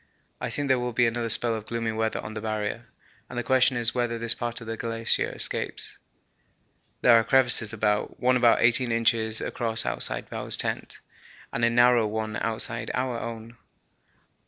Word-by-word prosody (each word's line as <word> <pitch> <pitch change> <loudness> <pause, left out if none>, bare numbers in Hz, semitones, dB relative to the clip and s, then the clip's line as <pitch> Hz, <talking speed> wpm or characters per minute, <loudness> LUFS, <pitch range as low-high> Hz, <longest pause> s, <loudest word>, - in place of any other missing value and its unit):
I - - -3
think 145 -1 -3
there 130 -2 +2
will 125 0 -3
be 120 +1 +3
another 115 0 -1
spell 115 +1 +2
of 110 -1 -6
gloomy 115 -1 -2
weather 110 0 -2
on 110 - -8
the 110 - -6
Barrier, 110 +2 -4 0.4
and 125 - -8
the 120 - -1
question 130 +1 +3
is 120 -1 +2
whether 120 -2 -1
this 115 0 +1
part 120 -1 -4
of 115 - -10
the 115 0 -4
glacier 115 0 0
escapes. - - 0 1.0
There 115 -2 +6
are - - 0
crevasses 120 -4 +3
about, 105 -2 -1
one 125 0 +2
about 120 -2 +4
eighteen 120 +1 +2
inches 110 -1 +2
across 115 -2 -1
outside - - -2
Bowers' - - 0
tent, - - -4 0.5
and 115 - -2
a 115 - +5
narrower 120 -1 +4
one 110 0 -4
outside 115 +1 -2
our 125 -2 -2
own. 115 0 -8
115 Hz, 180 wpm, -26 LUFS, 110-120 Hz, 1.0 s, There